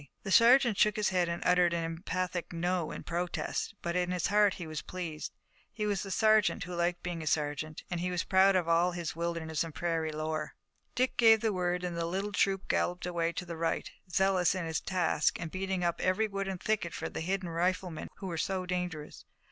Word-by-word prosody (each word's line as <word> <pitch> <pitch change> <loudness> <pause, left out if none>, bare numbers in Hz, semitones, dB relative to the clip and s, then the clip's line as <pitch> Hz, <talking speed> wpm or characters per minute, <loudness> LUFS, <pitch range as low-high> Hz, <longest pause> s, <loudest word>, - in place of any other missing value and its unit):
The 195 - -4
sergeant 235 -1 +6
shook 210 -1 +4
his 210 -1 +1
head 180 -2 +1
and 170 - -4
uttered 180 -1 +4
an 170 -1 -1
emphatic 175 +2 -3
no 175 -1 -1
in - - -7
protest, 175 +3 -3
but 170 0 -2
in 180 -1 +1
his 180 -1 -1
heart 205 -1 +4
he 175 - -6
was 155 -1 -5
pleased. 170 -4 -5 0.4
He 210 0 -3
was 205 -2 0
a 195 - -7
sergeant 215 0 +3
who 180 +1 -7
liked 175 0 -1
being 175 -2 -4
a 155 - -6
sergeant, 150 0 -1
and 175 - -1
he 180 +1 -1
was 180 -1 -1
proud 190 0 +4
of 180 -3 +1
all 170 +2 +3
his 170 -3 -4
wilderness 165 -2 -2
and 165 -2 -8
prairie 165 -2 -1
lore. 155 0 -3 0.4
Dick 255 +1 +1
gave 225 -2 +6
the 220 -2 +1
word 180 -1 -1
and 175 -1 -3
the 170 0 -1
little 195 +4 -2
troop 195 0 +1
galloped 180 0 0
away 170 -2 0
to 180 - -4
the 170 -1 -6
right, 165 0 -1 0.2
zealous 190 -1 +3
in 185 -2 -2
its 160 -1 -1
task 175 -5 +1
and 165 -2 -5
beating 190 -1 -2
up 170 -1 0
every 200 +4 +2
wood 195 -1 -3
and 190 -2 -4
thicket 210 -5 -1
for - - -3
the - - -5
hidden 185 +1 -2
riflemen 175 0 -1
who 195 - -9
were 170 -3 -3
so 190 +1 -1
dangerous. 180 -4 -4
180 Hz, 220 wpm, -31 LUFS, 170-190 Hz, 0.4 s, sergeant